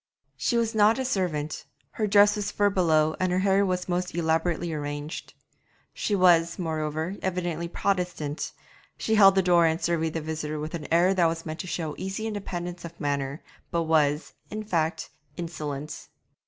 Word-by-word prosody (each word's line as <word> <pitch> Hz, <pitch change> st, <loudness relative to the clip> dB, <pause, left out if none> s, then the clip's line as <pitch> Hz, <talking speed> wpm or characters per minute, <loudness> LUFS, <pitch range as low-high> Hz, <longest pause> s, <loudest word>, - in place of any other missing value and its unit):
She 150 Hz, -, 0 dB
was 230 Hz, -1 st, +1 dB
not 215 Hz, +2 st, +4 dB
a 265 Hz, -, -2 dB
servant, 170 Hz, -, -1 dB, 0.3 s
her 215 Hz, -, -1 dB
dress 205 Hz, +1 st, +6 dB
was 205 Hz, -1 st, -2 dB
fur 205 Hz, 0 st, +2 dB
belowed 160 Hz, -4 st, +2 dB
and 185 Hz, -1 st, +1 dB
her 180 Hz, -, +1 dB
hair 195 Hz, +1 st, +3 dB
was 180 Hz, -2 st, -1 dB
most 180 Hz, -1 st, -2 dB
elaborately 165 Hz, 0 st, 0 dB
arranged. 145 Hz, +1 st, -5 dB, 0.6 s
She 210 Hz, -, -1 dB
was, 170 Hz, -3 st, +4 dB
moreover, 160 Hz, +1 st, -2 dB
evidently 175 Hz, -3 st, -2 dB
Protestant; 175 Hz, -5 st, -2 dB, 0.5 s
she 220 Hz, -, -1 dB
held 195 Hz, -3 st, +7 dB
the 190 Hz, -, +3 dB
door 175 Hz, -2 st, +5 dB
and 160 Hz, +1 st, 0 dB
surveyed 165 Hz, -1 st, 0 dB
the -, -, 0 dB
visitor 155 Hz, -1 st, -4 dB
with 155 Hz, +1 st, -5 dB
an 165 Hz, -3 st, -6 dB
air 175 Hz, +3 st, +4 dB
that 175 Hz, -3 st, +3 dB
was 165 Hz, 0 st, -3 dB
meant 155 Hz, 0 st, -5 dB
to 185 Hz, -, -5 dB
show 160 Hz, -4 st, -3 dB
easy 195 Hz, +3 st, -3 dB
independence 180 Hz, -5 st, -4 dB
of 170 Hz, 0 st, -9 dB
manner, 140 Hz, -1 st, -2 dB, 0.3 s
but 170 Hz, -1 st, 0 dB
was, 155 Hz, -1 st, +1 dB, 0.2 s
in 215 Hz, 0 st, -4 dB
fact, 165 Hz, -6 st, -1 dB, 0.3 s
insolent. 150 Hz, -4 st, -5 dB
170 Hz, 170 wpm, -26 LUFS, 155-190 Hz, 0.6 s, held